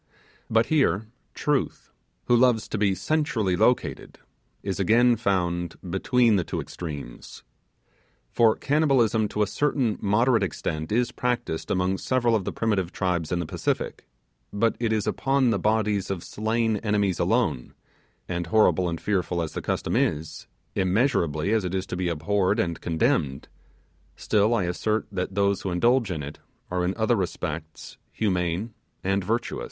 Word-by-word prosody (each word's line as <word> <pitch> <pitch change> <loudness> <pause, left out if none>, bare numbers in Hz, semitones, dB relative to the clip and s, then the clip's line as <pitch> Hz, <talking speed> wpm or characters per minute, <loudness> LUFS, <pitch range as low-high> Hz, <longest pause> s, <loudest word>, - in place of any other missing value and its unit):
But 115 +1 +3
here, 110 - +2 0.3
Truth, 145 -3 -1 0.3
who 120 - +4
loves 120 -3 +3
to 110 - -2
be 100 -2 +2
centrally 140 - 0
located, - - 0 0.5
is 100 0 -3
again 120 +5 +4
found 90 -5 -1
between 110 +5 +2
the 90 - +1
two - - -4
extremes; 75 -8 -8 0.9
for 115 -2 +4
cannibalism 130 -8 +2
to 105 +1 0
a - - +2
certain 130 -1 0
moderate 115 +3 +3
extent 80 -3 -3
is 120 +2 +1
practised 120 -11 -2
among 95 +1 0
several 120 -2 +1
of 100 -4 -1
the - - -2
primitive 100 -6 -1
tribes 90 -4 -1
in 90 - +1
the 85 - -2
Pacific, - - -3 0.4
but 115 +2 +1
it 115 -2 0
is 110 -2 0
upon 135 -2 +1
the 100 - 0
bodies 105 -2 +1
of 95 -3 -3
slain 110 0 0
enemies 105 -3 0
alone, - - 0 0.5
and 85 -1 -3
horrible 95 -2 +3
and 85 -1 -4
fearful 90 -3 -1
as 80 -2 -2
the - - -4
custom - - -2
is, 80 +1 -1 0.3
immeasurably 95 - +1
as 110 -3 +2
it 90 +1 -3
is 95 0 -1
to 90 - -5
be 90 -1 -1
abhorred 95 +6 0
and 85 -6 -1
condemned, 80 - 0 0.7
still 110 +2 +2
I 100 - +1
assert 105 +5 -1
that 95 0 -3
those 100 -1 +1
who 95 - -3
indulge 115 +6 +2
in 80 -5 -3
it 70 +1 -8 0.3
are 90 0 0
in 90 +2 -1
other 115 +2 +2
respects 80 -5 -5
humane 90 +1 -1 0.3
and 95 0 0
virtuous. 115 +5 -2
100 Hz, 155 wpm, -25 LUFS, 90-115 Hz, 0.9 s, who